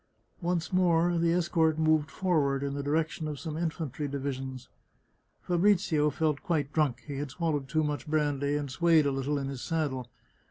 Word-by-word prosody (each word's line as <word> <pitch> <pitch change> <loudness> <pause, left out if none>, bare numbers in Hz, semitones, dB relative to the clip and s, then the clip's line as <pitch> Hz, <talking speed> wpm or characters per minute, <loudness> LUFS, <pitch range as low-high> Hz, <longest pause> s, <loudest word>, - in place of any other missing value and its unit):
Once 175 +1 -1
more 175 -1 +3
the 165 0 +2
escort 165 -2 +2
moved 155 -1 +2
forward, 145 -7 +1
in 140 0 -2
the 140 - -3
direction 155 +2 -1
of 150 -2 -5
some 160 -3 -5
infantry 160 -3 -3
divisions. 135 -2 -4 0.8
Fabrizio 175 -4 +3
felt 155 -1 0
quite 150 -4 -1
drunk; 150 -6 +1
he 145 -2 -5
had 145 0 -3
swallowed 145 -2 -2
too 155 +2 +1
much 150 0 -3
brandy, 145 -2 0
and 145 -2 -4
swayed 165 0 +4
a 140 - +2
little 135 +2 -1
in 135 -1 -3
his 135 -2 -5
sad 160 -3 0
dle. 130 -2 -6
150 Hz, 175 wpm, -29 LUFS, 140-165 Hz, 0.8 s, swayed